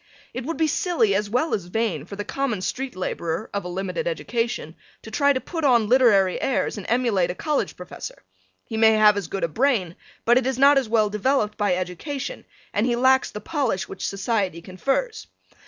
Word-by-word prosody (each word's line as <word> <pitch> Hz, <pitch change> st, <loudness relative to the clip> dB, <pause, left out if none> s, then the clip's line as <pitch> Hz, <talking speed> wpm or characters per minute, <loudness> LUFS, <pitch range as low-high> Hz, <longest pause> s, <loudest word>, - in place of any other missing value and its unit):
It 255 Hz, -, -5 dB
would 330 Hz, +3 st, -3 dB
be 320 Hz, -, +2 dB
silly 305 Hz, -, +1 dB
as 205 Hz, +1 st, 0 dB
well 250 Hz, +9 st, 0 dB
as 195 Hz, -, -1 dB
vain 180 Hz, -5 st, -2 dB
for 200 Hz, -, -8 dB
the 205 Hz, +1 st, -5 dB
common 245 Hz, -5 st, -2 dB
street 260 Hz, +6 st, -3 dB
laborer 175 Hz, +1 st, -3 dB
of 200 Hz, -, -2 dB
a -, -, -6 dB
limited 195 Hz, -, -3 dB
education 240 Hz, -, -2 dB, 0.3 s
to -, -, -10 dB
try 285 Hz, -3 st, +3 dB
to 265 Hz, -, +1 dB
put 325 Hz, +4 st, -5 dB
on 240 Hz, -6 st, +4 dB
literary 210 Hz, -8 st, +4 dB
airs 270 Hz, -, 0 dB
and 205 Hz, -3 st, -7 dB
emulate 230 Hz, -7 st, +2 dB
a 180 Hz, -, -3 dB
college 300 Hz, +5 st, -1 dB
professor; -, -, -9 dB, 0.4 s
he 225 Hz, -, -5 dB
may 220 Hz, 0 st, +6 dB
have 215 Hz, -1 st, +6 dB
as 200 Hz, -5 st, -3 dB
good 195 Hz, -, -4 dB
a -, -, +3 dB
brain, 205 Hz, -, 0 dB, 0.3 s
but 240 Hz, +2 st, +5 dB
it 255 Hz, -, -3 dB
is 265 Hz, -2 st, -1 dB
not 280 Hz, +1 st, +6 dB
as 255 Hz, -5 st, -5 dB
well 215 Hz, -2 st, +2 dB
developed 215 Hz, 0 st, +1 dB
by 205 Hz, -4 st, +1 dB
education, 265 Hz, -, -5 dB, 0.3 s
and 210 Hz, +4 st, +1 dB
he 240 Hz, -, +1 dB
lacks 260 Hz, +2 st, +3 dB
the 210 Hz, -, -7 dB
polish 240 Hz, -, -1 dB
which 190 Hz, -, -5 dB
society 195 Hz, -3 st, -1 dB
confers. 270 Hz, -, -2 dB
225 Hz, 205 wpm, -24 LUFS, 195-270 Hz, 0.4 s, may